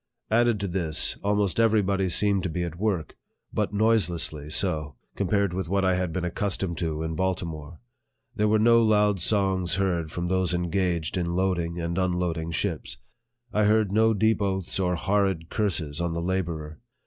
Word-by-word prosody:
Added 120 -1 +3
to 100 - -1
this, 85 -4 0
almost 100 -1 +1
every 110 -2 +4
body 95 -1 0
seemed 100 +2 +2
to 90 - -2
be 85 +2 -2
at 85 0 -6
work, 95 -7 -1 0.4
but - - 0
noiselessly 95 -9 0
so, 75 -5 0 0.2
compared 100 -1 0
with 90 -2 -3
what 100 0 +1
I 95 - +3
had 90 -2 -1
been 90 +2 -2
accustomed 90 -1 -2
to 80 -2 -2
in 80 0 -3
Baltimore. 85 -3 -3 0.6
There 105 -2 +2
were 110 +1 +4
no 115 +2 +5
loud 105 -3 +3
songs 95 -3 +1
heard 90 -5 -1
from 85 0 -3
those 90 -1 +1
engaged 85 -1 -1
in 85 -1 -1
loading 90 -2 0
and 85 +2 -2
unloading 90 -3 -1
ships. 85 - -3 0.6
I 105 0 +3
heard 105 -1 +3
no 110 +1 +3
deep 110 +1 +2
oaths 95 -2 -1
or 90 -1 +1
horrid 95 -2 0
curses 85 -7 -1
on 85 -1 -1
the 85 - -2
laborer. 85 -4 -3
95 Hz, 170 wpm, -26 LUFS, 85-100 Hz, 0.6 s, no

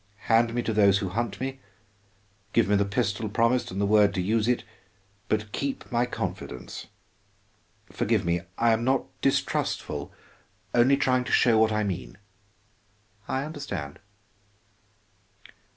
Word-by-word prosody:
Hand 115 0 +3
me 120 - 0
to 115 - -1
those 100 -2 +5
who 100 -2 -3
hunt 105 +1 -3
me, 135 +1 -4 0.9
give 115 - +3
me 105 - +3
the 100 0 +2
pistol 105 0 -1
promised 115 +4 +1
and 95 - -5
the 100 - +2
word 105 0 +4
to - - -1
use 105 +4 +1
it, 125 0 +1 0.7
but 105 -1 -1
keep 140 +2 -4
my 120 0 +1
confidence. 60 - -6 1.0
Forgive - - 0
me, 85 0 +1 0.2
I 115 0 +3
am 110 +1 +1
not 130 +1 +2 0.2
distrustful, - - -1 0.6
only 125 +3 +5
trying 130 -1 +2
to - - -4
show 115 -3 +4
what 110 0 +4
I 110 0 +1
mean." 95 -1 -4 1.1
"I 135 +1 -1
understand." 100 - -6
110 Hz, 140 wpm, -26 LUFS, 100-120 Hz, 1.1 s, those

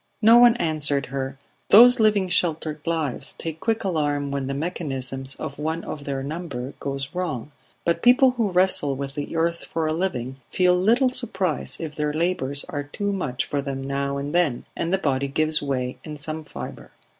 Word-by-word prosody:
No 230 +2 +8
one 240 0 +7
answered 150 -7 +1
her. 135 0 -3 0.3
Those 245 +4 +8
living 210 -3 +3
sheltered 160 -3 0
lives 160 -6 -1
take 160 -1 -6
quick 225 +3 -1
alarm 145 -6 -1
when 140 -1 -2
the 135 - -2
mechanism 135 -5 -3
of 140 - -6
one 160 +2 -2
of 145 -2 -7
their 135 -1 -3
number 140 -4 -5
goes 135 -1 -3
wrong, 155 -7 -3 0.3
but 170 - +1
people 255 +2 +6
who 235 -4 0
wrestle 180 -6 +2
with 140 0 -5
the 145 +2 -5
earth 170 +1 0
for 165 -1 -2
a 155 - 0
living 135 -8 -2
feel 180 -1 +3
little 230 +8 +3
surprise 195 - 0
if 155 -3 -5
their 150 0 -1
labours 150 -4 0
are 145 - -3
too 200 +7 -3
much 140 -10 -2
for 145 - -2
them 135 -1 -4
now 140 0 -2
and 140 +2 -4
then, 170 -8 +1
and 170 - -2
the 190 - +3
body 140 -6 0
gives 155 +2 +1
way 130 -2 -2
in 150 -2 -7
some 155 +1 -3
fibre. - - -8
155 Hz, 185 wpm, -24 LUFS, 140-180 Hz, 0.3 s, No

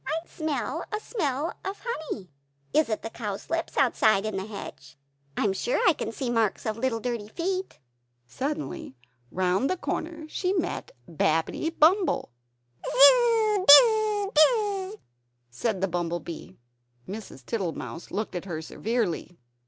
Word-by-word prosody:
"I - - -1
smell 310 -1 -3
a 425 - -1
smell 315 - -2
of 390 +1 -6
honey; 310 - -5 0.4
is 310 -4 +3
it 215 - -2
the 225 - -4
cowslips 230 +10 -4
outside, 220 -6 +3
in 215 -2 -3
the 190 +1 -3
hedge? 135 -10 -9 0.4
I - - +1
am 200 -3 +2
sure 485 - -1
I 360 - +6
can 225 - -4
see 265 - -5
the 240 - -1
marks 225 -3 0
of 220 - -1
little 230 0 -1
dirty 235 -3 -3
feet." 370 - -3 0.5
Suddenly 275 - -4 0.3
round 185 - +1
a 370 - 0
corner, 320 -2 -4
she 365 +4 -1
met 360 -4 -2 0.2
Babbitty 165 - 0
Bumble 350 - +3 0.5
"Zizz, 435 - +5
Bizz, 425 +4 +7
Bizzz!" 395 +3 +3 0.6
said 190 - -2
the 195 - +2
bumble 175 -1 -2
bee. 160 - -9 0.5
Mrs. 195 - -8
Tittlemouse 175 - -4
looked 215 +2 -3
at 180 0 -4
her 170 -5 -4
severely. 180 -1 -3
250 Hz, 145 wpm, -27 LUFS, -, 0.6 s, Bizz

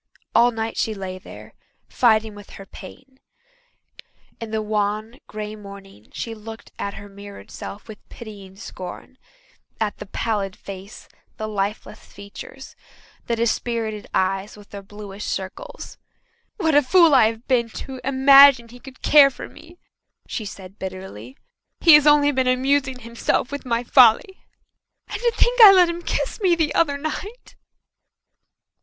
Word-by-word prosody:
All 235 +1 +5
night 225 -1 -4
she 220 - -1
lay 185 -1 -7
there, - - -13 0.3
fighting 220 -3 +2
with 205 0 -13
her 195 - -11
pain. 260 +8 -14 1.2
In 230 - -7
the 220 0 -2
wan, 215 +2 -2
grey 215 0 -7
morning 200 - -13
she 230 - -6
looked 220 +1 -11
at 200 - -4
her 205 - -10
mirrored 200 0 -12
self 205 - -9
with 220 -2 -13
pitying 200 -4 -11
scorn 195 +5 -10 0.6
at 215 -2 -2
the - - -8
pallid 205 -2 -3
face, 195 +2 -11 0.3
the 215 -2 -4
lifeless 205 0 -4
features, 200 +6 -12 0.5
the 235 - 0
dispirited 225 -2 -2
eyes 195 +2 -1
with 205 -1 -16
their 200 - -8
bluish 205 0 -9
circles. - - -7 0.6
"What 320 -6 0
a 290 - +6
fool 335 +3 +4
I 255 -5 +6
have 225 +1 -6
been 240 -3 +1
to 260 +3 -8
imagine 275 -2 +6
he 245 +2 -14
could 260 0 -14
care 290 -2 +7
for 270 - -9
me!" 345 +2 -16 0.5
she 220 - -5
said 195 -1 -11
bitterly. 185 - -8 0.4
"He 330 - +7
has 300 0 +7
only 295 -1 +5
been 260 -2 0
amusing 265 0 0
himself 235 +3 -2
with 285 -2 -6
my 235 0 0
folly. 250 - +4 0.6
And - - -6
to 480 -1 +2
think - - +2
that 445 - +12
I - - +10
let 360 -2 +5
him 340 0 -5
kiss 450 - -3
me 365 -3 +3
the 320 -3 0
other 285 -4 +1
night!" 385 +11 -7
225 Hz, 155 wpm, -22 LUFS, 205-275 Hz, 1.2 s, that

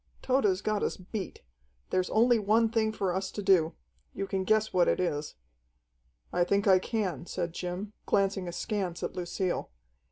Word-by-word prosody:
"Tode's 210 -8 +2
got 215 -1 0
us - - -1
beat. 190 +2 -6 0.5
There's 185 -1 +1
only 235 +1 +4
one 220 +2 +3
thing 220 -1 +1
for 195 -4 -1
us 190 +1 -2
to 205 - -4
do. 180 -4 +4 0.4
You 195 - -2
can 190 -1 -2
guess 215 +1 +2
what 180 -1 +4
it - - +2
is." 150 -5 -2 1.0
"I 175 - +3
think 200 +3 +1
I 190 -1 +7
can," 185 - -2
said 170 -1 -3
Jim, 180 +4 -5
glancing 195 -2 +1
askance 175 0 -3
at - - -2
Lucille. 180 0 -2
190 Hz, 165 wpm, -29 LUFS, 180-215 Hz, 1.0 s, I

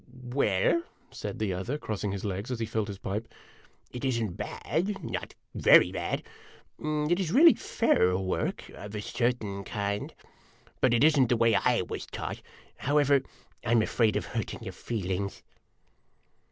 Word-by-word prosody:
"Well," 130 - +2 0.3
said - - -5
the 105 -3 -1
other, 95 +11 -3
crossing 105 -6 -3
his 100 +1 -4
legs 100 +3 -3
as 125 -3 -3
he 115 - 0
filled 110 -1 -2
his 100 -2 -6
pipe, 105 +4 -4 0.6
"it 125 - -7
is 130 -3 +1
n't 105 -6 -2
bad 195 +3 -2
not - - -5 0.2
very - - +6
bad. - - -2 0.6
It 155 +3 0
is 175 -4 -1
really 320 - +8
fair 90 - +2
work, 95 -1 -2
of 105 +1 -9
a - - -2
certain 110 -4 -1
kind. 100 0 -3 0.7
But 125 -2 +4
it 115 - +3
is 155 -1 +5
n't 130 -3 +4
the 120 - +3
way 115 -1 +4 0.3
/ - - -6
was - - -5
taught. - - -5 0.4
However, 145 -1 +3 0.4
I 115 - -3
'm 115 -2 +5
afraid 110 -1 +2
of - - -1
hurting - - -4
your - - -6
feelings." 100 -3 -3
115 Hz, 165 wpm, -29 LUFS, 100-140 Hz, 0.7 s, really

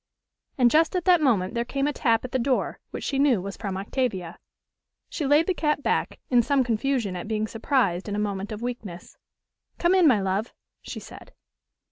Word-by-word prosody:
And 245 -3 +4
just 320 +4 +3
at 360 - -1
that 360 -3 +5
moment 215 -10 +2
there 235 -1 0
came 275 +3 -2
a 295 - 0
tap 230 -4 +1
at 250 - -7
the 260 - 0
door, 255 +1 0
which - - -7
she 275 - -1
knew 275 -7 +4
was 195 +1 -6
from 195 -2 -4
Octavia. 195 -5 -3 0.7
She 295 - -3
laid 295 +3 +4
the 375 - +1
cap 300 -4 -1
back, - - -1
in 245 -1 +6
some 275 +2 +2
confusion 235 -3 -1
at 180 - -6
being 215 -1 -1
surprised 220 - 0
in 205 - -2
a 210 0 0
moment 200 +1 -5
of 215 +2 -6
weakness. 225 -8 -6 0.6
"Come 345 +1 +2
in, 370 -3 +5
my 245 -7 +5
love," 195 +4 -2 0.3
she - - -7
said. - - -13
240 Hz, 200 wpm, -25 LUFS, 205-280 Hz, 0.7 s, in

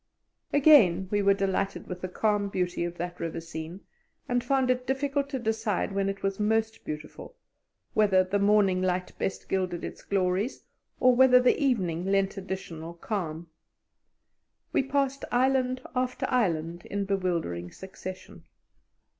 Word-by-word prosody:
Again 235 - +6
we 205 -1 +2
were 200 0 +4
delighted 195 0 -1
with 180 -1 -7
the 185 - -3
calm 205 +2 0
beauty 180 -2 -1
of 175 0 -6
that 175 +1 -5
river 165 0 -3
scene, 165 +2 -7 0.5
and 245 -1 0
found 260 0 +2
it 250 0 -2
difficult 280 +1 0
to 275 - -2
decide 220 -4 -1
when 195 0 0
it 195 0 -5
was 195 0 -1
most 220 +1 0
beautiful 155 - -8 0.6
whether 200 -3 +4
the 195 +2 -1
morning 200 -2 +3
light 180 0 -1
best 190 - -3
gilded 185 -3 -1
its - - -7
glories 195 +4 -1 0.4
or 255 -1 +5
whether 250 0 +7
the 250 +3 +3
evening 185 -11 +1
lent 195 0 +1
additional 180 -4 -6
calm. 170 -4 -4 1.3
We - - +4
passed 275 0 -1
island 255 0 +2
after 255 0 -1
island 175 -8 0
in 200 0 -2
bewildering 170 - -2
succession. 190 -1 -9
195 Hz, 145 wpm, -28 LUFS, 180-245 Hz, 1.3 s, whether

